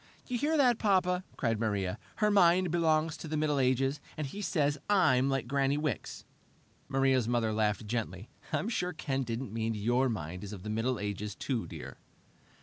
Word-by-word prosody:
"You 250 Hz, -, -3 dB
hear 300 Hz, +6 st, +1 dB
that, 250 Hz, -5 st, +4 dB
Papa?" 185 Hz, -3 st, +2 dB
cried 115 Hz, -4 st, 0 dB
Maria. 100 Hz, -3 st, -1 dB, 0.2 s
"Her 210 Hz, -1 st, +2 dB
mind 180 Hz, -2 st, +4 dB
belongs 160 Hz, -2 st, +2 dB
to -, -, -7 dB
the 155 Hz, 0 st, -2 dB
Middle 150 Hz, -2 st, +1 dB
Ages, 135 Hz, +2 st, +1 dB, 0.2 s
and 155 Hz, -, -2 dB
he 195 Hz, +10 st, -6 dB
says 150 Hz, -6 st, +1 dB
I'm 150 Hz, -10 st, +4 dB
like 135 Hz, -3 st, -1 dB
Granny 140 Hz, +1 st, +1 dB
Wicks!" 150 Hz, -6 st, -3 dB, 0.6 s
Maria's 135 Hz, -3 st, +2 dB
mother 115 Hz, -2 st, +1 dB
laughed 105 Hz, -1 st, 0 dB
gently. 105 Hz, -3 st, -4 dB, 0.2 s
"I'm -, -, 0 dB
sure 180 Hz, -6 st, -1 dB
Ken 135 Hz, -4 st, -2 dB
didn't 115 Hz, -2 st, -4 dB
mean 115 Hz, 0 st, -1 dB
your 120 Hz, +5 st, +2 dB
mind 90 Hz, -4 st, -4 dB
is 105 Hz, 0 st, -6 dB
of 95 Hz, -3 st, -8 dB
the 105 Hz, -, -4 dB
Middle 115 Hz, +3 st, 0 dB
Ages, 105 Hz, 0 st, -4 dB
too, 125 Hz, -5 st, -2 dB
dear." -, -, -9 dB
135 Hz, 180 wpm, -31 LUFS, 110-160 Hz, 0.6 s, that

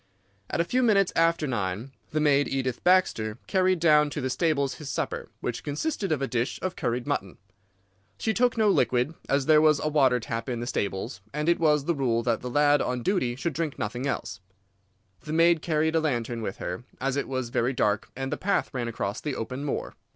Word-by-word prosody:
At -, -, -2 dB
a -, -, +4 dB
few 255 Hz, +8 st, +1 dB
minutes 200 Hz, -6 st, +3 dB
after 165 Hz, -1 st, +3 dB
nine 110 Hz, -1 st, -3 dB, 0.2 s
the 155 Hz, -, -1 dB
maid, 145 Hz, -2 st, +3 dB
Edith 130 Hz, -2 st, -2 dB
Baxter, 125 Hz, -12 st, +2 dB
carried 185 Hz, -2 st, +2 dB
down 150 Hz, -2 st, +5 dB
to 145 Hz, -, -4 dB
the 130 Hz, -2 st, -2 dB
stables 140 Hz, -1 st, +1 dB
his 145 Hz, -, -6 dB
supper, -, -, -3 dB
which -, -, -3 dB
consisted 195 Hz, -, -2 dB
of 140 Hz, -3 st, 0 dB
a -, -, 0 dB
dish 125 Hz, +2 st, -1 dB
of 185 Hz, -1 st, -2 dB
curried 120 Hz, -2 st, -2 dB
mutton. 120 Hz, -10 st, -3 dB, 0.8 s
She 220 Hz, -, 0 dB
took 245 Hz, 0 st, +2 dB
no 220 Hz, -1 st, +3 dB
liquid, 125 Hz, -, +2 dB, 0.2 s
as 140 Hz, 0 st, +2 dB
there 155 Hz, 0 st, +6 dB
was 155 Hz, -2 st, +4 dB
a 155 Hz, -, -1 dB
water 135 Hz, -5 st, +3 dB
tap 115 Hz, +1 st, -4 dB
in 120 Hz, -2 st, -2 dB
the 120 Hz, -, -3 dB
stables, 95 Hz, -5 st, -3 dB
and 150 Hz, +2 st, -2 dB
it 170 Hz, -, +3 dB
was 150 Hz, -3 st, +3 dB
the 170 Hz, -, +2 dB
rule 120 Hz, -5 st, 0 dB
that 115 Hz, -1 st, 0 dB
the 125 Hz, -, -5 dB
lad 145 Hz, +2 st, +4 dB
on 125 Hz, -1 st, -2 dB
duty 125 Hz, -, 0 dB
should 165 Hz, +6 st, -2 dB
drink 160 Hz, -4 st, -3 dB
nothing 120 Hz, +6 st, -3 dB
else. -, -, -3 dB, 0.8 s
The 150 Hz, -, -6 dB
maid 165 Hz, 0 st, +4 dB
carried 160 Hz, -1 st, +1 dB
a -, -, +5 dB
lantern 120 Hz, -6 st, -1 dB
with 100 Hz, -3 st, -4 dB
her, 90 Hz, +6 st, -5 dB, 0.2 s
as 135 Hz, 0 st, -1 dB
it 140 Hz, -, -1 dB
was 130 Hz, -2 st, -3 dB
very 120 Hz, 0 st, +1 dB
dark 105 Hz, -4 st, 0 dB
and 135 Hz, 0 st, -3 dB
the -, -, -2 dB
path 200 Hz, -4 st, 0 dB
ran 125 Hz, -3 st, -2 dB
across 105 Hz, -3 st, -3 dB
the 145 Hz, -3 st, -3 dB
open 130 Hz, +5 st, -4 dB
moor. 145 Hz, -, -3 dB
140 Hz, 215 wpm, -27 LUFS, 120-160 Hz, 0.8 s, there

